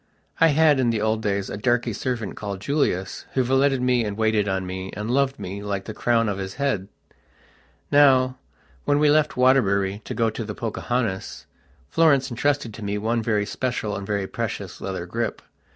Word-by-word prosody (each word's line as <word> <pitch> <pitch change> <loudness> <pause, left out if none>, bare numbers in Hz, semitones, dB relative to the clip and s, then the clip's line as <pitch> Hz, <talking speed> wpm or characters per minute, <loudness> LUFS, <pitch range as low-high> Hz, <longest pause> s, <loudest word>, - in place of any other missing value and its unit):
I 165 - +7
had, 150 -2 +4
in 125 -2 +2
the 115 -2 0
old 110 +1 0
days, 100 -2 -1
a - - -4
darky 120 +1 +1
servant, 115 -1 -3
called 100 -2 -5
Julius, 100 -6 -1
who 130 - +3
valeted 135 +1 +2
me, 125 -2 +3
and 105 -1 -4
waited 110 -2 +2
on 95 -1 -1
me, 95 +1 -5
and 105 +3 -4
loved 135 +1 +1
me, 100 +2 -6
like 100 -2 -3
the 110 - -6
crown 115 +1 +1
of 100 -1 -2
his 95 0 -5
head. 135 -9 -1 1.0
Now, 130 -3 +5 0.4
when 145 - +2
we 150 0 +4
left 150 -2 +2
Waterbury 100 -6 +3
to - - -5
go 115 -2 +1
to 110 - -5
the 105 -1 -6
"Pocahontas", 115 -3 -3 0.4
Florence 140 - +3
entrusted 140 -1 0
to 110 - -9
me 100 0 -2
one 115 +3 0
very 105 -2 0
special 120 -3 -2
and 100 -1 -6
very 100 -2 -1
precious 110 -4 -5
leather 95 -3 -4
grip. 115 +6 -3
115 Hz, 185 wpm, -24 LUFS, 100-130 Hz, 1.0 s, I